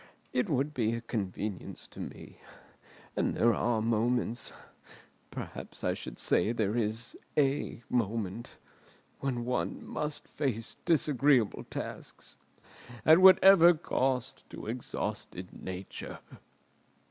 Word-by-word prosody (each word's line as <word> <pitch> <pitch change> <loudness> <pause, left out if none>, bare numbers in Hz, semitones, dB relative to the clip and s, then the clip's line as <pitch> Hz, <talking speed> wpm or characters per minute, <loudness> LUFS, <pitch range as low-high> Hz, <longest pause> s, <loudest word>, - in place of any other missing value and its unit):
It 125 - +1
would 140 +1 0
be 115 -4 +1
a 115 - -4
convenience 105 -3 -4
to - - -13
me, - - -8 0.8
and - - 0
there 115 0 +4
are 110 +1 +1
moments—perhaps 115 +1 -4
I - - +2
should - - -8
say 105 - +2
there 110 -2 0
is 115 0 -2 0.2
a 140 -4 +1
moment—when 120 +3 -4
one 125 0 -2
must 150 0 -4
face 120 -6 -3
disagreeable 140 - +3
tasks, - - -7 0.7
at 160 +2 +8
whatever 185 -2 +8
cost 130 -5 -1
to - - -8
exhausted 105 -5 -5
nature!" 95 +1 -6
120 Hz, 100 wpm, -31 LUFS, 110-140 Hz, 0.8 s, at